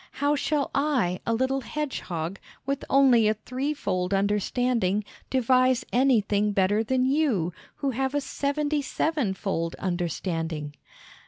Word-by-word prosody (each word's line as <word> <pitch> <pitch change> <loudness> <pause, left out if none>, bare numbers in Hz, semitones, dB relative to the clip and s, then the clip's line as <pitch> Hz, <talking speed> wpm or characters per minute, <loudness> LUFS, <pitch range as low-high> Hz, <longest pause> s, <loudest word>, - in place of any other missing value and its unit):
How 285 +1 +1
shall 290 0 0
I, 260 -11 +1
a 230 - +2
little 260 +3 0
hedgehog, 195 - -4 0.3
with 275 +1 -2
only 260 -5 +5
a 215 - +2
threefold 215 -7 -2
understanding, 210 +1 +1 0.3
devise 255 0 +3
anything 210 -5 +3
better 200 +3 +2
than 255 +3 +1
you, 260 - +1 0.2
who 275 - -1
have 265 +3 -1
a 290 - +1
seventy 290 +2 -1
sevenfold 195 - -1
understanding?" 165 -4 -3
240 Hz, 115 wpm, -26 LUFS, 190-275 Hz, 0.3 s, only